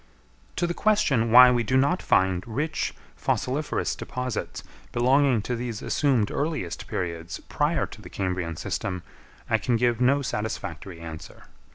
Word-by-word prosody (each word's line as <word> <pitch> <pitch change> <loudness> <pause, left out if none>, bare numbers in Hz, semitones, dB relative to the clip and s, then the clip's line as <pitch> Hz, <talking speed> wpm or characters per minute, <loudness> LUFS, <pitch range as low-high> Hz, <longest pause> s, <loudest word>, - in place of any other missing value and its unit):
To 175 - 0
the 175 - -1
question 145 - +2
why 125 +2 +9
we 120 -1 +2
do 130 +3 +1
not 145 +8 +2
find 95 -1 +2
rich 150 +8 -2 0.2
fossiliferous 145 +4 -1
deposits 125 -2 -4 0.3
belonging 130 -1 +3
to 125 - -2
these 120 -2 -4
assumed 130 -8 +1
earliest 145 - -3
periods 85 -1 -4
prior 150 +3 +1
to 110 - -12
the 90 - -11
Cambrian 90 -4 -2
system, 90 +2 -3 0.4
I - - +2
can 120 - +1
give 120 0 +1
no 140 +3 +3
satisfactory 100 - -4
answer. 80 -1 -9
120 Hz, 145 wpm, -26 LUFS, 95-140 Hz, 0.4 s, why